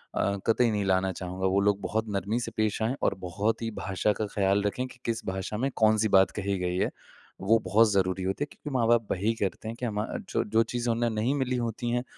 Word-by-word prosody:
अ, 100 0 +1
कतई 115 +1 +4
नहीं 105 -1 0
लाना 95 0 +2
चाहूँगा। 90 +1 -4
वो 95 +1 +2
लोग 100 0 +2
बहुत 110 +2 -1
नरमी 100 +4 -1
से - - -4
पेश 110 0 0
आएँ 120 +5 0
और - - +3
बहुत 100 +6 -1
ही 115 - -1
भाषा 95 +1 -1
का 110 - -2
ख़्याल 100 0 +2
रखें 125 +5 -1
कि, 125 - -15
किस 115 -1 -2
भाषा 95 +2 -3
में 135 +4 0
कौन-सी 110 0 +3
बात 95 - +4
कही 100 0 -1
गई 90 0 -1
है। - - +1 0.5
वो 110 +4 +4
बहुत 105 +3 +4
ज़रूरी 95 -1 +1
होती 95 +9 -1
है - - -24
क्योंकि 150 - -8
माँ-बाप 115 -1 +3
वही 105 +5 +1
करते 100 +3 -2
हैं 115 - -5
कि 125 - -2
हम 105 -1 -2
अ, - - -4
जो - - 0
जो 110 +2 +3
चीज़ें 120 +1 -2
उन्हें 120 0 0
नहीं 115 +6 0
मिली 130 -2 0
होती 120 0 -2
है, 120 +1 0
105 Hz, 240 wpm, -28 LUFS, 95-115 Hz, 0.5 s, कतई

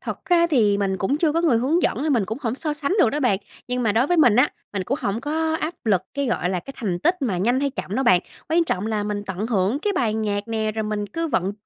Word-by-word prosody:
Thật - - -6
ra 340 -1 +4
thì 220 -11 +2
mình 195 -1 0
cũng 200 +10 0
chưa 315 -2 +2
có 330 - +1
người 315 -9 +3
hướng 300 +9 +1
dẫn - - 0
nên 305 -1 +1
mình 230 -6 +2
cũng 220 +6 -4
hổng 235 -4 -2
so 300 +3 -3
sánh 295 +2 -2
được 240 - +4
đó 295 - -2
bạn. 245 -8 +2 0.3
Nhưng 250 0 -1
mà 220 -3 +2
đối 235 +5 +2
với 355 - +1
mình 245 -10 +5
á, 250 - +4 0.2
mình 195 -3 -2
cũng 270 +9 -2
hổng 200 +3 -2
có 315 +3 -1
áp 315 +3 -2
lực 195 -5 +2
cái, 280 -1 -1
gọi 180 -7 0
là, 185 -2 -1
cái 275 +10 -10
thành 190 -7 -2
tích 350 - +1
mà 205 -9 0
nhanh 240 +8 +1
hay 280 0 0
chậm 205 -6 -5
đâu 270 - 0
bạn, 185 -6 +5 0.3
quan 335 +2 +3
trọng 210 - -1
là 215 -2 -1
mình 205 0 -3
tận 190 +3 -3
hưởng 215 +3 +1
cái 410 +5 -1
bài 230 - 0
nhạc 210 -1 -2
nè, 220 -1 -1
rồi 220 +1 -2
mình 210 -1 -2
cứ 330 +11 -3
vận 190 -5 0
230 Hz, 295 wpm, -23 LUFS, 205-295 Hz, 0.3 s, mình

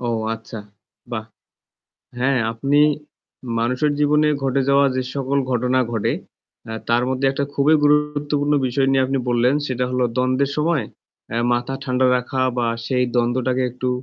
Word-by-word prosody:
ও 120 - -3 0.3
আচ্ছা, 115 0 -9 0.5
বাহ! 110 -2 -3 0.9
হ্যাঁ, 130 0 +1
আপনি 140 +5 +1 0.8
মানুষের 125 +6 +1
জীবনে 150 +1 +3 0.2
ঘটে 135 0 +1
যাওয়া 140 0 +5
যে 130 - 0
সকল 140 0 -1
ঘটনা 125 +1 +1
ঘটে, 110 -3 0 0.5
অ্যা 110 - -6
তার 120 +1 +3
মধ্যে 130 +1 -1
একটা 140 +1 -2
খুবই 145 +3 +4
গুরুত্বপূর্ণ 145 0 +1
বিষয় 135 +2 +1
নিয়ে 135 -1 +3
আপনি 135 +1 -1
বললেন। 120 +3 +2
সেটা 125 -1 -1
হলো 125 0 +1
দ্বন্দ্বের 130 +2 +1
সময়ে 150 -5 +1 0.4
অ্যা 115 - -2
মাথা 120 +2 -2
ঠান্ডা 130 -1 +1
রাখা 125 +1 -3 0.2
বা 120 - +1 0.2
সেই 125 -1 +1
দ্বন্দ্বটাকে 125 +2 +1
একটু 125 +1 -3
130 Hz, 150 wpm, -21 LUFS, 125-140 Hz, 0.9 s, যাওয়া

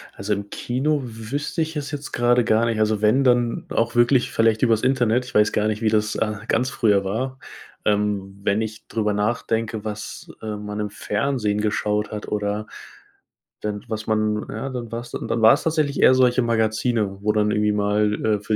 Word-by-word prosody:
Also, 100 +2 -2
im 100 0 -5
Kino 140 +7 -1
wüsste 125 +8 -4
ich 160 0 -2
es 145 -1 -4
jetzt 145 -1 -6
grade 120 0 +3
gar 110 +1 +2
nicht, 115 -2 -1
also, 110 -1 +1
wenn 110 +6 +4
dann 120 -2 +2
auch 115 +1 0
wirklich 120 +1 +3
vielleicht 115 -1 +2
über's 115 -3 +3
Internet 125 -2 +2
ich - - -12
weiß 105 0 +4
gar 105 0 +1
nicht, 110 0 -2
wie 110 - +2
das, 105 -1 +1
äh, 110 -1 0
ganz 125 +3 +1
früher 100 -6 +2
war, 130 +7 -3 0.5
ähm, 100 -2 0
wenn 100 +2 +1
ich 110 0 -6
drüber 105 -2 -1
nachdenke, 110 +1 -1
was, 105 0 -6
äh, 110 -1 -4
man 105 0 -6
im 105 0 -2
Fernsehen 105 0 -1
geschaut 105 0 -1
hat 105 -1 -6
oder 105 0 -2 1.0
wenn 105 -1 -3
was 110 -1 -4
man 110 -1 0
ja, 115 +6 -4
dann 120 -4 -6
war's 120 +1 -6
dann 115 - -2
war's 110 +1 +6
tatsächlich 155 -3 0
eher - - +7
solche 125 -1 +4
Magazine, 110 -2 0
wo 105 +1 +2
dann 105 0 +2
irgendwie 105 0 +2
mal, 105 0 +1
äh, 105 -1 +2
für 110 +1 -1
110 Hz, 190 wpm, -22 LUFS, 105-120 Hz, 1.0 s, eher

